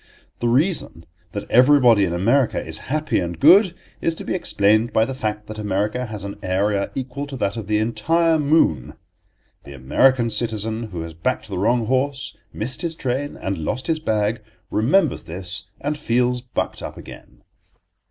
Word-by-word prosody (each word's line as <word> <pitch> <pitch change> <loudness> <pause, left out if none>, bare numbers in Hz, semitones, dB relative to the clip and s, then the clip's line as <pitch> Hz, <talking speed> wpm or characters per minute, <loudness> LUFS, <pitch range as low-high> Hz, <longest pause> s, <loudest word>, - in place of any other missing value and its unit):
The 120 - 0
reason 130 - +1 0.3
that 100 - -4
everybody 125 -5 +6
in 85 - -2
America 120 +8 +2
is 80 0 -4
happy 155 +2 0
and 85 -2 -4
good 190 - +6 0.3
is 165 - +1
to - - -5
be - - -3
explained 110 - +2
by 110 - +3
the 135 - -4
fact 105 -4 -3
that 110 0 -8
America 105 +4 -1
has 105 -3 -7
an 100 +1 -7
area 100 +1 0
equal 135 +2 -4
to 140 -2 -7
that 100 -3 -1
of 110 -4 -6
the 105 0 +1
entire 160 +9 +1
moon. 140 - +2 0.7
The 70 - -11
American 115 - +2
citizen 110 0 -2
who 90 -6 -6
has 80 0 -7
backed 110 +6 -2
the 95 -3 -3
wrong 115 +4 +2
horse, 135 +3 -1 0.2
missed 125 +4 -4
his 165 -2 -3
train 135 +1 -3
and 95 -2 -3
lost 125 +11 -3
his 160 -1 0
bag, 110 -5 0 0.3
remembers 140 - +2
this 90 +3 -5
and 145 +2 -2
feels 125 -3 0
bucked 125 0 -4
up - - -7
again. - - -13
115 Hz, 170 wpm, -21 LUFS, 100-135 Hz, 0.7 s, everybody